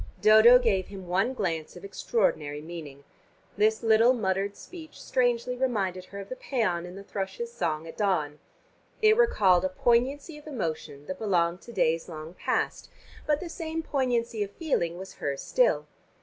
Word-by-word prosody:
Dodo 220 Hz, +3 st, +8 dB
gave 210 Hz, -7 st, +1 dB
him 195 Hz, -2 st, -9 dB
one 195 Hz, +9 st, 0 dB
glance 165 Hz, -8 st, -3 dB
of 180 Hz, -, -10 dB
extraordinary 175 Hz, -8 st, -1 dB
meaning. 155 Hz, -4 st, -9 dB, 0.5 s
This 220 Hz, +2 st, +2 dB
little 225 Hz, +2 st, +5 dB
muttered 200 Hz, -3 st, -1 dB
speech 320 Hz, -4 st, -11 dB
strangely 245 Hz, -1 st, 0 dB
reminded 200 Hz, -8 st, -1 dB
her 200 Hz, +1 st, -9 dB
of 195 Hz, -, -8 dB
the 255 Hz, -, -4 dB
pæan 210 Hz, -11 st, -1 dB
in 180 Hz, -, -10 dB
the 195 Hz, -, -9 dB
thrush's 200 Hz, +4 st, -5 dB
song 165 Hz, -7 st, -2 dB
at 165 Hz, -, -10 dB
dawn. 155 Hz, -8 st, 0 dB, 0.6 s
It 435 Hz, 0 st, +7 dB
recalled 200 Hz, -, +4 dB
a 185 Hz, -, +1 dB
poignancy 260 Hz, -, +1 dB
of 300 Hz, -, -17 dB
emotion 160 Hz, -, -4 dB
that 185 Hz, +2 st, -6 dB
belonged 175 Hz, -4 st, +1 dB
to 235 Hz, -, -11 dB
days 165 Hz, -5 st, 0 dB
long 155 Hz, 0 st, -8 dB
past, -, -, -2 dB, 0.4 s
but 300 Hz, -1 st, +2 dB
the 360 Hz, -, -5 dB
same 325 Hz, -1 st, -4 dB
poignancy 240 Hz, -6 st, -1 dB
of 205 Hz, -, -1 dB
feeling 200 Hz, -, -1 dB
was 190 Hz, +1 st, -8 dB
hers 140 Hz, -1 st, -2 dB
still. -, -, +2 dB
200 Hz, 165 wpm, -27 LUFS, 175-245 Hz, 0.6 s, Dodo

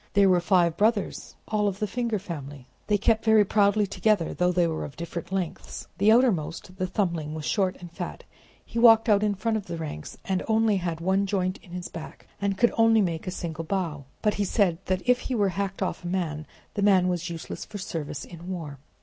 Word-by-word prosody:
There 200 Hz, -1 st, +5 dB
were 180 Hz, -1 st, +5 dB
five 170 Hz, -2 st, +3 dB
brothers, 215 Hz, 0 st, 0 dB
all 210 Hz, -1 st, +1 dB
of 195 Hz, -1 st, -2 dB
the 210 Hz, -, -1 dB
finger 235 Hz, +1 st, -1 dB
family. 145 Hz, -8 st, -7 dB, 0.2 s
They 210 Hz, -, +3 dB
kept 220 Hz, +2 st, +2 dB
very 220 Hz, -2 st, +5 dB
proudly 205 Hz, +1 st, +3 dB
together, 200 Hz, -3 st, +1 dB
though 180 Hz, 0 st, +2 dB
they 175 Hz, -1 st, +2 dB
were 160 Hz, -1 st, -2 dB
of 140 Hz, -, -8 dB
different 170 Hz, +1 st, -6 dB
lengths: 190 Hz, -4 st, -4 dB
the 205 Hz, +2 st, +5 dB
outermost, 185 Hz, -7 st, +1 dB
the 185 Hz, 0 st, -1 dB
thumbling, 170 Hz, -5 st, -1 dB
was 155 Hz, -1 st, -5 dB
short 190 Hz, -3 st, +1 dB
and 175 Hz, -1 st, -10 dB
fat; 175 Hz, 0 st, -6 dB, 0.4 s
he 235 Hz, -, -4 dB
walked 225 Hz, -1 st, +7 dB
out 205 Hz, -1 st, +5 dB
in 210 Hz, -1 st, +1 dB
front 220 Hz, +3 st, 0 dB
of 205 Hz, -, -6 dB
the 170 Hz, -1 st, -4 dB
ranks, 150 Hz, -, -6 dB
and 190 Hz, -1 st, 0 dB
only 220 Hz, -2 st, +3 dB
had 170 Hz, -3 st, -3 dB
one 190 Hz, +3 st, +1 dB
joint 185 Hz, -1 st, -1 dB
in -, -, -18 dB
his 180 Hz, 0 st, -5 dB
back, 165 Hz, -1 st, -9 dB, 0.2 s
and 200 Hz, -1 st, 0 dB
could 240 Hz, +3 st, +3 dB
only 225 Hz, -1 st, +6 dB
make 170 Hz, -2 st, -2 dB
a -, -, 0 dB
single 165 Hz, -3 st, -4 dB
bow; 165 Hz, -6 st, -2 dB, 0.2 s
but 210 Hz, -1 st, +3 dB
he 205 Hz, -, -1 dB
said 190 Hz, -4 st, +1 dB
that 185 Hz, +4 st, -2 dB
if 250 Hz, 0 st, +4 dB
he 255 Hz, -, -3 dB
were 205 Hz, -3 st, +2 dB
hacked 195 Hz, +1 st, -2 dB
off 185 Hz, -, -3 dB
a -, -, -4 dB
man, 160 Hz, -4 st, -2 dB, 0.3 s
that 205 Hz, -, -2 dB
man 190 Hz, -3 st, +5 dB
was 175 Hz, -1 st, -1 dB
useless 165 Hz, -1 st, -6 dB
for 210 Hz, -, -8 dB
service 155 Hz, -6 st, -5 dB
in 175 Hz, +1 st, -10 dB
war. 155 Hz, -7 st, -5 dB
185 Hz, 220 wpm, -26 LUFS, 170-210 Hz, 0.4 s, walked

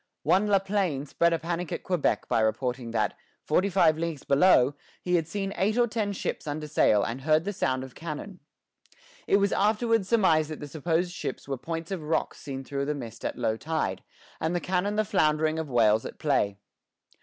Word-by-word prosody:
One 195 Hz, +3 st, +3 dB
La 200 Hz, -1 st, +5 dB
Plaine 190 Hz, -8 st, -1 dB
spread 170 Hz, +4 st, +2 dB
a 165 Hz, -, +2 dB
panic 170 Hz, +1 st, -4 dB
at -, -, -4 dB
Quebec 180 Hz, -5 st, 0 dB
by -, -, +2 dB
reporting 120 Hz, +2 st, -1 dB
that, 110 Hz, -3 st, 0 dB, 0.3 s
forty 200 Hz, +2 st, +2 dB
five 165 Hz, -5 st, +3 dB
leagues 165 Hz, -4 st, -3 dB
below, 140 Hz, -3 st, +4 dB, 0.3 s
he 180 Hz, -, -3 dB
had 165 Hz, -3 st, +2 dB
seen 195 Hz, +2 st, -3 dB
eight 210 Hz, +4 st, +1 dB
or 240 Hz, -, +5 dB
ten 220 Hz, -3 st, -2 dB
ships 190 Hz, -, -4 dB
under 150 Hz, +1 st, -3 dB
sail 105 Hz, -8 st, +3 dB
and 120 Hz, +4 st, -4 dB
heard 155 Hz, +2 st, +3 dB
the 205 Hz, +3 st, -3 dB
sound 130 Hz, -7 st, -1 dB
of 130 Hz, -2 st, -10 dB
cannon. 170 Hz, +4 st, -7 dB, 0.9 s
It 200 Hz, -, +5 dB
was 200 Hz, 0 st, +2 dB
afterwards 215 Hz, 0 st, +2 dB
surmised 165 Hz, -9 st, +3 dB
that 155 Hz, -, -6 dB
the 145 Hz, -, -7 dB
supposed 165 Hz, +4 st, -1 dB
ships 155 Hz, -7 st, -5 dB
were 140 Hz, -, -2 dB
points 165 Hz, +6 st, -5 dB
of 190 Hz, -4 st, -3 dB
rocks 155 Hz, +2 st, -1 dB
seen 135 Hz, -2 st, -6 dB
through 140 Hz, +1 st, -3 dB
the 150 Hz, +1 st, -1 dB
mist 115 Hz, -4 st, -8 dB
at -, -, -3 dB
low 110 Hz, 0 st, 0 dB
tide, 150 Hz, -, -2 dB, 0.4 s
and 160 Hz, +2 st, -1 dB
the -, -, +1 dB
cannon 190 Hz, +3 st, -1 dB
the 215 Hz, 0 st, +1 dB
floundering 155 Hz, -2 st, +2 dB
of 160 Hz, -2 st, -4 dB
whales 110 Hz, -3 st, +3 dB
at -, -, -8 dB
play. 105 Hz, -9 st, +1 dB
160 Hz, 200 wpm, -27 LUFS, 135-190 Hz, 0.9 s, La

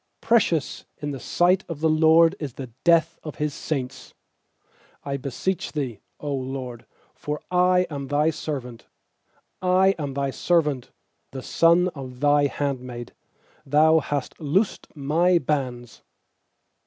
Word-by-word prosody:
15Precious 180 Hz, -, +1 dB
in 145 Hz, 0 st, -4 dB
the 135 Hz, -, -6 dB
sight 175 Hz, +9 st, +2 dB
of 165 Hz, -3 st, -5 dB
the 160 Hz, -, +2 dB
LORD 160 Hz, +1 st, +5 dB
Is 145 Hz, -6 st, -5 dB
the 130 Hz, -2 st, -8 dB
death 165 Hz, -1 st, +3 dB
of 155 Hz, -, -7 dB
His 150 Hz, -2 st, -2 dB
saints. 130 Hz, -4 st, -5 dB, 0.9 s
16I 140 Hz, -1 st, -3 dB
beseech 155 Hz, +8 st, -3 dB
Thee, 130 Hz, -9 st, -3 dB, 0.2 s
0 145 Hz, -1 st, -3 dB
LORD, 130 Hz, -3 st, -5 dB, 0.3 s
for 150 Hz, 0 st, -5 dB
I 180 Hz, 0 st, +4 dB
am 140 Hz, -2 st, -5 dB
Thy 150 Hz, +3 st, +2 dB
servant; 135 Hz, -6 st, -6 dB, 0.7 s
I 185 Hz, +1 st, +4 dB
am 140 Hz, -3 st, -4 dB
Thy 140 Hz, -1 st, -1 dB
servant, 150 Hz, -6 st, 0 dB, 0.4 s
the 130 Hz, -1 st, -8 dB
son 170 Hz, +2 st, +3 dB
of 130 Hz, -6 st, -9 dB
Thy 145 Hz, 0 st, +4 dB
handmaid; 125 Hz, -4 st, -4 dB, 0.5 s
Thou 155 Hz, +3 st, +4 dB
hast 145 Hz, -2 st, -4 dB
loosed 175 Hz, +8 st, 0 dB
my 165 Hz, +5 st, +2 dB
bands. 130 Hz, -5 st, -3 dB
145 Hz, 130 wpm, -24 LUFS, 135-165 Hz, 0.9 s, LORD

